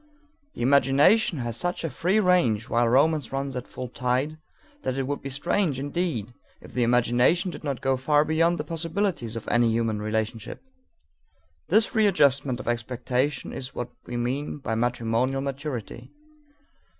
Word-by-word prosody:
The - - -3
imagination 140 - +4
has 120 -3 -3
such 175 +7 -2
a 165 - -1
free 180 - +1
range 175 - +2
while 120 0 +2
romance 145 +2 +2
runs 135 0 -3
at 125 - -5
full 130 - -6
tide 130 +5 -1 0.4
that 130 - -2
it 135 - 0
would 140 +2 -3
be 135 - -5
strange 145 +2 0
indeed 140 - -2 0.3
if - - -14
the 125 - 0
imagination 125 - +3
did - - -10
not 140 -3 -3
go 135 -1 +2
far 145 +3 +3
beyond 165 +2 +2
the 150 - -3
possibilities 165 - -2
of 115 - -6
any 120 -1 +3
human 110 -2 0
relationship. 110 - -3 1.1
This 220 0 +3
readjustment 140 - +3
of - - -8
expectation 125 +3 -1
is 130 0 -6
what 120 0 -4 0.2
we 120 - -4
mean 130 +6 -2
by 135 -5 -4
matrimonial 120 +2 0
maturity. 140 -3 -5
135 Hz, 155 wpm, -26 LUFS, 120-155 Hz, 1.1 s, imagination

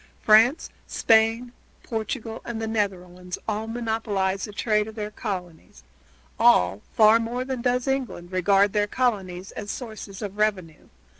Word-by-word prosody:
France, 225 +8 +5 0.2
Spain, 225 +2 +2 0.3
Portugal, 225 0 -4
and 235 -2 -5
the 225 - -2
Netherlands 180 -4 -3
all 215 0 -2
monopolize 220 -5 -1
the 210 - -9
trade 210 0 0
of 220 - -9
their 210 -1 -4
colonies; 180 -7 -7 0.6
all, 95 +3 +4
far 220 +1 +6
more 240 +2 -3
than 260 -2 -4
does 250 +1 0
England, 255 -10 -3
regard 195 +2 +3
their 205 -1 +1
colonies 195 -7 -2
as 205 - -7
sources 215 -4 -7
of 205 0 -6
revenue. 185 -7 -1
215 Hz, 140 wpm, -25 LUFS, 195-230 Hz, 0.6 s, far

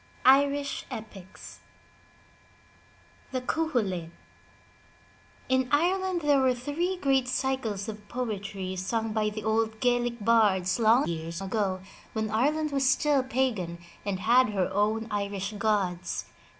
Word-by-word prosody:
*IRISH 280 +1 +3
EPICS 205 -4 -10 1.7
THE 260 - -1
CUCHULAIN 230 - -1 1.4
In 260 -1 +1
Ireland 360 +4 +1
there 290 -2 +4
were 260 -1 +3
three 315 +9 -2
great 270 -6 +2
cycles 250 -6 -1
of 210 -1 -8
poetry 200 -6 -4
sung 220 +4 -2
by 215 -1 +1
the 210 0 -6
old 220 0 0
Gaelic 245 -1 +1
bards 205 -4 +3
long 230 +4 +5
years 165 0 -4
ago 195 -1 -1 0.3
when 220 -1 -2
Ireland 300 +7 +1
was 275 -2 +2
still 280 +1 +3
pagan 245 -10 -1 0.3
and 195 -2 -3
had 245 +2 +5
her 190 -3 0
own 215 +3 +1
Irish 200 0 -2
gods. 195 -5 0
225 Hz, 120 wpm, -28 LUFS, 200-265 Hz, 1.7 s, long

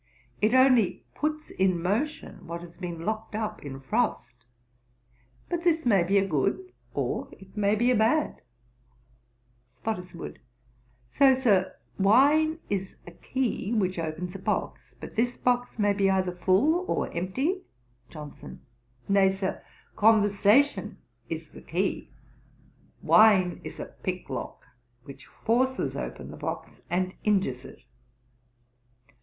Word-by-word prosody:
It 220 +4 +3
only 255 -6 +4
puts 305 0 -3
in 185 -2 +1
motion 210 - -3
what 170 +1 -5
has 175 -1 -12
been 170 -2 -6
locked 220 0 -3
up 215 0 -3
in 135 -2 -7
frost. 135 - -1 1.1
But 345 -1 -2
this 335 -2 +2
may 200 -6 +4
be 195 +4 +3
good, 195 - -1 0.2
or - - -2
it 195 +1 -16
may 205 0 +2
be 240 +4 +3
bad.' 235 +7 +1 1.3
SPOTTISWOODE. 180 - -6 0.7
'So, 270 -2 +5
Sir, 195 -8 +2 0.2
wine 290 +10 +4
is 195 -1 -3
a 175 - -10
key 235 +2 -2
which 185 -5 0
opens 165 +2 -4
a 195 - -7
box; - - -3
but - - -9
this 245 +2 0
box 245 -1 0
may 205 -2 +3
be 195 -1 +2
either 190 -1 +1
full 225 - +3
or - - -1
empty.' 260 - -1 0.5
JOHNSON. 150 -2 -10 0.5
'Nay, 195 -1 +4
Sir, 190 0 -3 0.3
conversation 215 +5 +3 0.3
is - - -5
the - - -13
key: - - -2 0.9
wine 195 -5 +5
is - - -8
a - - -4 0.2
pick - - -3
lock, - - -5 0.4
which 140 +2 -12
forces 260 +3 0
open - - -6
the - - -10
box - - -6
and 185 +1 0
injures 185 - +1
it. - - -13
205 Hz, 125 wpm, -27 LUFS, 185-245 Hz, 1.3 s, So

